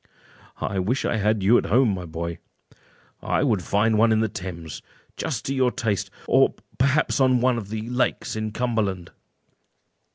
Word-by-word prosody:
"I 95 - -2
wish 115 +9 0
I - - 0
had 105 -1 +1
you 110 +5 +5
at - - -4
home, 125 +3 +4
my 90 -2 -5
boy; 85 +1 -5 0.8
I - - 0
would 110 -9 +1
find 105 +3 +1
one 115 +1 +5
in 110 - +3
the 110 - +2
Thames, 85 -5 -7 0.3
just - - -3
to 135 - -1
your 130 -2 +2
taste, 110 -5 -2 0.2
or - - +4 0.2
perhaps 140 +3 +2
on 130 -2 +4
one 125 -1 +2
of 100 -3 -9
the 110 +1 -4
lakes 125 -2 -1
in 110 0 -2
Cumberland." 105 -7 -2
110 Hz, 170 wpm, -24 LUFS, 95-125 Hz, 0.8 s, you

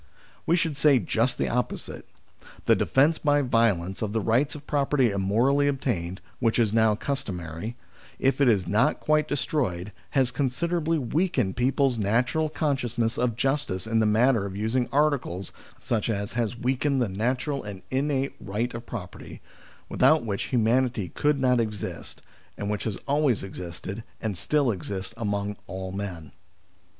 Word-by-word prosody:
We 170 - +4
should 165 -4 0
say 145 -1 +5
just 120 +1 +1
the - - 0
opposite: 125 +1 -3 0.6
the - - +5
defence 150 +5 +3
by 145 -1 +3
violence 105 -7 +1
of 105 -2 -2
the 115 - +1
rights 120 +8 +1
of 150 - -10
property 140 -4 +2
immorally 115 +9 +2
obtained, 105 -10 -2 0.2
which 115 -2 +2
is 110 -3 +2
now 110 -1 +4
customary, 100 - -4 0.4
if 135 +1 +1
it 140 - +5
has 100 -7 +3
not 115 - +2
quite 155 0 +2
destroyed, 115 - -1 0.3
has 130 -2 +3
considerably 165 +4 0
weakened 135 - 0
people's 130 0 +1
natural 120 +10 +1
con 150 -2 0
sciousness 120 -2 -1
of 125 -2 +1
justice 135 -8 -1
in 115 0 +1
the 110 - +3
matter 110 0 +3
of 95 - -7
using 115 +4 0
articles, 140 - 0 0.4
i.e., 115 -3 +3
has 110 +2 -2
weakened 130 +3 0
the 120 - +2
natural 125 +8 -1
and 100 -3 -8
innate 135 0 0
right 105 +4 -3
of 120 0 -7
property, 100 -7 -8 0.5
without 155 -5 +3
which 100 -3 -2
humanity 120 -4 +1
could 145 - +1
not 125 -2 +3
exist, 105 -3 -4 0.3
and 100 0 -2
which 105 - -3
has 110 -4 -2
always 140 -7 +2
existed 95 +3 -7 0.2
and 110 -3 -2
still 140 - +1
exists 95 +1 -4
among 100 -2 -2
all 95 0 -5
men. 90 -7 -6
120 Hz, 155 wpm, -26 LUFS, 100-140 Hz, 0.6 s, say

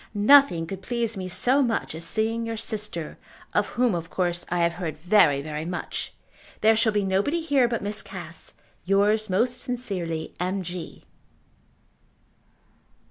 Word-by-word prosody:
Nothing 210 -5 +6
could 190 +3 -7
please 230 +1 -2
me 185 -2 -4
so 255 +9 +2
much 235 - 0
as 160 +1 -6
seeing 225 +5 -1
your 230 0 -4
sister, 210 -7 -3 0.3
of - - +2
whom 245 -3 +1
of 165 -1 -4
course 175 -1 -1
I 175 0 0
have 170 0 +2
heard 160 -4 -3
very 160 -5 +4
very 155 0 -4
much. 175 +2 -4 0.5
There 220 +1 +5
shall 220 0 +3
be 205 -1 +1
nobody 195 - +1
here 285 -6 +3
but 235 -3 -3
Miss 210 +1 0
Cass. 170 -4 -9 0.3
Yours 205 +3 +2
most 235 +7 0
sincerely, 185 -10 -4
M. 185 +2 -1
G. 175 0 -7
200 Hz, 150 wpm, -25 LUFS, 175-230 Hz, 0.5 s, Nothing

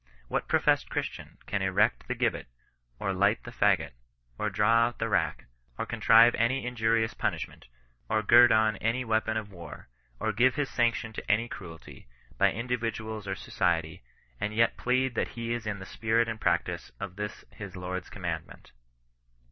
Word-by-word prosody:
What - - -1
professed - - +2
Christian - - -5
can 100 - -2
erect 95 +2 +1
the - - -2
gibbet, - - -1 0.5
or 95 - -2
light 100 +4 +2
the 120 - -8
faggot, 100 -9 +2 0.5
or - - 0
draw 115 +2 +3
out 120 - -7
the 115 - -2
rack, 105 - 0 0.3
or - - -2
contrive 115 +1 +6
any 120 +4 +1
inju 120 -2 -2
rious 110 0 0
punishment, - - -3 0.4
or 110 0 +1
gird 120 +3 +7
on 110 -2 +3
any 115 +5 -1
weapon 110 0 0
of 105 -2 -5
war, 85 -8 -11 0.3
or 110 - -1
give 125 +4 +3
his 145 -1 -1
sanction 115 -2 0
to - - -2
any 115 +3 +2
cruelty, 80 - -10 0.3
by - - +5
individuals 110 -2 -3
or 95 - -2
so - - -11
ciety, 85 -3 0 0.4
and 105 +1 -3
yet 115 +1 +3
plead 130 +1 +1
that - - 0
he 115 0 -2
is 120 -2 -4
in 105 -1 -2
the 95 - -9
spirit 115 +3 +1
and 110 -1 -5
practice - - -1
of 90 - -6
this 105 0 -6
his 100 -3 -9
Lord's 90 0 -5
commandment 85 -4 -6
110 Hz, 175 wpm, -28 LUFS, 100-115 Hz, 0.5 s, gird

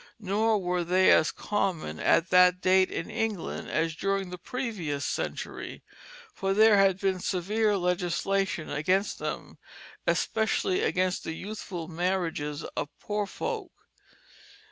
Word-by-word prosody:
Nor 215 +2 +1
were 180 -2 -1
they 185 +2 +4
as 160 - +5
common 170 - -2
at 165 - +2
that 180 0 +6
date 185 +1 +4
in - - -4
England 220 -6 -3
as 165 0 0
during 195 0 -1
the 180 - -7
previous 185 - -3
century, - - -4 0.5
for 195 -1 -1
there 215 0 +6
had 195 -1 +4
been 190 -1 0
severe 205 +4 0
legislation 180 0 0
against 185 +8 0
them, - - -5 0.5
especially 220 -4 +1
against 185 0 0
the 160 - -4
youthful 185 -2 -6
marriages 165 -4 -2
of 145 - -2
poor 210 -1 -2
folk. 440 - -4
185 Hz, 125 wpm, -28 LUFS, 175-205 Hz, 0.5 s, that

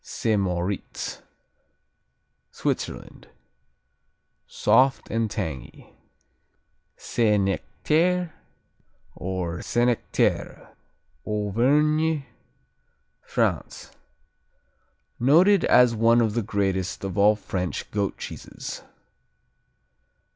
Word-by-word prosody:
Saint 110 -3 -1
Moritz 90 +1 -3 1.3
Switzerland - - -4 1.2
Soft 135 +1 +2
and 115 -1 0
tangy. 80 - -6 1.0
Saint 105 -4 +1
Nectaire, 170 - 0 0.8
or 90 -1 -4
Senecterre 120 0 0 0.5
Auvergne, 145 +9 +1 1.0
France - - -2 1.3
Noted 170 - +5
as 125 -1 +5
one 115 +1 +4
of 110 -3 +1
the 120 - 0
greatest 95 -3 -2
of 95 -2 -4
all 105 +1 +5
French 90 -4 -4
goat 100 -2 -2
cheeses. - - -8
110 Hz, 70 wpm, -25 LUFS, 95-130 Hz, 1.3 s, Noted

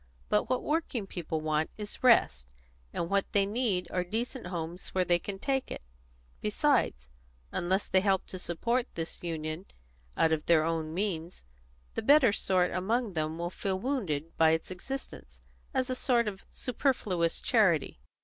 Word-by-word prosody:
But 105 - +2
what 255 - 0
working 300 -8 -1
people 165 -4 -3
want 155 0 0
is 210 +2 -7
rest, 65 - +4 0.4
and 170 - -2
what 200 +2 0
they 200 -1 +4
need 200 -4 0
are 180 - 0
decent 230 +4 -3
homes 175 0 -5
where 185 -1 +3
they 175 -1 +3
can 195 +2 -5
take 265 +5 -1
it. - - -6 0.6
Besides, 210 - +1 0.4
unless 190 +3 0
they 190 - +4
help 195 -1 +2
to 185 - -6
support 235 +9 -1
this 165 -1 -4
union 160 +1 -4 0.5
out 160 - +4
of 155 -1 -1
their 165 -2 +5
own 160 -1 -1
means, 175 - -3 0.5
the - - -2
better 270 -3 +6
sort 185 -3 +2
among 215 +4 0
them 155 0 -2
will 175 +1 -3
feel 190 0 -2
wounded 185 - -2
by 160 -1 +6
its 160 +3 -2
existence, 265 +9 -7 0.3
as 260 -3 0
a 255 - -1
sort 245 -2 +2
of 195 -2 -6
superfluous 210 - 0
charity." 185 - +2
185 Hz, 160 wpm, -30 LUFS, 165-235 Hz, 0.6 s, better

